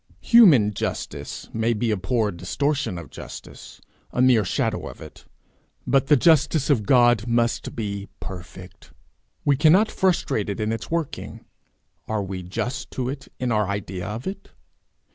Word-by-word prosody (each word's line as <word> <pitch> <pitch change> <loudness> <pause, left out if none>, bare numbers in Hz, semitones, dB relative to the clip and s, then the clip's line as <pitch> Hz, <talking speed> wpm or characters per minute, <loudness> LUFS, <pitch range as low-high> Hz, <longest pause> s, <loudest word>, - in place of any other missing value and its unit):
Human 150 - +6
justice 100 - -5
may 115 +1 +1
be 115 +1 -1
a - - +2
poor 105 +3 0
distortion 140 - -2
of 85 -3 -9
justice, - - -10 0.3
a - - -5
mere 125 -4 +5
shadow 90 - -1
of - - -10
it; - - -12 0.6
but 135 -1 +2
the 150 0 +6
justice 155 -1 +3
of 110 -8 +1
God 120 -3 +4
must 115 0 0
be 100 -2 -4
perfect. 90 -5 -10 0.5
We 145 - +4
cannot 170 +10 +4
frustrate 175 - 0
it 100 - -4
in 110 0 -1
its 115 -1 -4
working; 165 -3 -4 0.6
are 110 -2 -1
we 95 -1 -5
just 115 +8 -4
to 125 -1 -2
it 135 0 -7
in 125 -1 -1
our 105 -2 +1
idea 95 -2 -4
of 110 +5 -5
it? 195 +1 -6
115 Hz, 155 wpm, -23 LUFS, 100-140 Hz, 0.6 s, Human